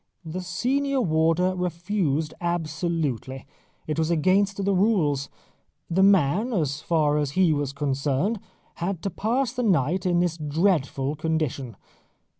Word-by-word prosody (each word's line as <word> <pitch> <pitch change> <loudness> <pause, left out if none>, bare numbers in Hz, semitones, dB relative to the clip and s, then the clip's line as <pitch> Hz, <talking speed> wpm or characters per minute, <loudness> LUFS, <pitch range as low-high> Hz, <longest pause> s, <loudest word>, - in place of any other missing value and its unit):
The 170 +3 -4
senior 265 +10 0
warder 165 -1 +2
refused 170 -3 -1
absolutely; 160 -6 -2 0.4
it 155 +1 -2
was 160 0 +1
against 190 +4 +2
the 200 - +2
rules. 180 -9 +1 0.6
The 185 +3 +3
man, 195 - +3
as 150 -6 -1
far 150 -3 +2
as 145 -2 -2
he 180 -4 +4
was 145 -2 -1
concerned, 140 - -1 0.4
had 175 0 -3
to 195 - -2
pass 240 +7 -1
the 250 - -2
night 180 - +1
in 175 -1 +2
this 175 -2 0
dreadful 150 -3 0
condition. 155 -7 -2
170 Hz, 130 wpm, -25 LUFS, 150-190 Hz, 0.6 s, he